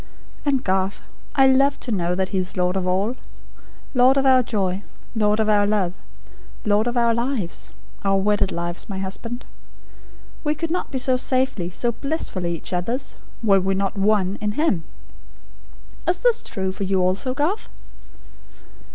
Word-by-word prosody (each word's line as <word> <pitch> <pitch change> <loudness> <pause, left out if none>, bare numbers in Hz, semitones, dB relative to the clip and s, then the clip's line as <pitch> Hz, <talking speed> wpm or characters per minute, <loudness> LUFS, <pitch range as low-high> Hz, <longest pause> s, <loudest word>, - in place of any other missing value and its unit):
And 275 -3 +2
Garth, 190 +1 0 0.3
I 270 -1 +6
love 275 +2 +4
to 245 - -3
know 180 -3 0
that 190 0 0
He 190 - 0
is 185 0 -3
Lord 180 0 +1
of 185 -1 -1
All 195 +7 +1 0.8
Lord 255 +1 +5
of 275 - +2
our 260 -1 +6
joy; 195 -5 -1 0.3
Lord 210 -1 +2
of 220 - +2
our 205 -1 +4
love; 200 -4 +1 0.7
Lord 210 +2 +3
of 240 +1 -1
our 235 -1 +4
lives 235 - -2 0.3
our 195 0 +3
wedded 200 0 +2
lives, 170 +3 -4
my 195 - -4
husband. 230 +6 -4 1.0
We 300 0 +1
could 325 +1 -3
not 360 - -1
be 265 - -2
so 260 0 +2
safely, 255 -9 +1
so 235 +6 0
blissfully, 220 - -2
each 165 - -5
other's, 230 +10 -2 0.3
were 200 -3 +5
we 190 +1 0
not 195 +1 -1
ONE, 200 -1 +2
IN 210 0 -1
HIM. 210 - +1 1.2
Is 355 +1 +3
this 485 -2 +3
true 190 -3 -3
for 190 - -5
you 190 0 +1
also, 185 +8 0
Garth?" 320 +10 -1
210 Hz, 165 wpm, -23 LUFS, 190-260 Hz, 1.2 s, I